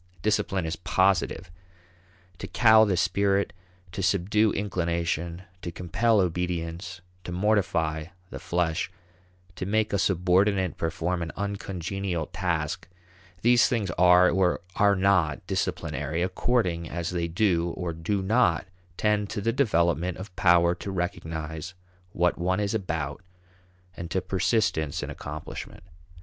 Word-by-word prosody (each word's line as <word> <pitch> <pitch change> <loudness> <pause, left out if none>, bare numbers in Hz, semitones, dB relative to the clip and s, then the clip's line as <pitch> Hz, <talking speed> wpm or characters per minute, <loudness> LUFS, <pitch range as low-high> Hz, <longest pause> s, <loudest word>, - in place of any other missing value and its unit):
Discipline 95 -3 0
is 80 +1 -3
positive. 95 -2 +1 0.9
To - - -5
cow 110 -2 +6
the 95 -4 0
spirit, 100 0 +1 0.4
to 95 - -4
subdue 100 +3 +2
inclination, 85 -2 -2 0.2
to 85 - -5
compel 95 +7 +1
obedience, 90 +1 -2 0.2
to 90 - -6
mortify 90 -5 +1 0.3
the - - -6
flesh, 85 0 -1 0.6
to 95 - -4
make 110 +1 +1
a 100 - +2
subordinate 95 +1 +2
perform 85 +2 -2
an 80 -1 -3
uncongenial 95 -3 -3
task 85 -2 -2 0.6
these 120 0 +5
things 105 -7 -1
are 90 +1 +5
or 95 -2 +2
are 100 -1 +4
not 95 -6 +2
disciplinary 85 +2 -2
according 90 -4 0
as 85 0 -3
they 85 -2 -1
do 85 -1 +1
or 85 -2 -3
do 90 +5 -2
not 95 - +2 0.3
tend 105 -1 +1
to - - -3
the 115 +3 0
development 90 - +1
of 95 0 -9
power 85 -1 +4
to 90 +3 -7
recognize 80 -2 -4 0.4
what 90 -1 +1
one 95 +2 0
is 100 0 -1
about 80 -8 -3 0.7
and 85 -1 -6
to 95 - 0
persistence 95 -4 0
in - - -5
accomplishment. 75 +1 -8
90 Hz, 130 wpm, -26 LUFS, 85-100 Hz, 0.9 s, cow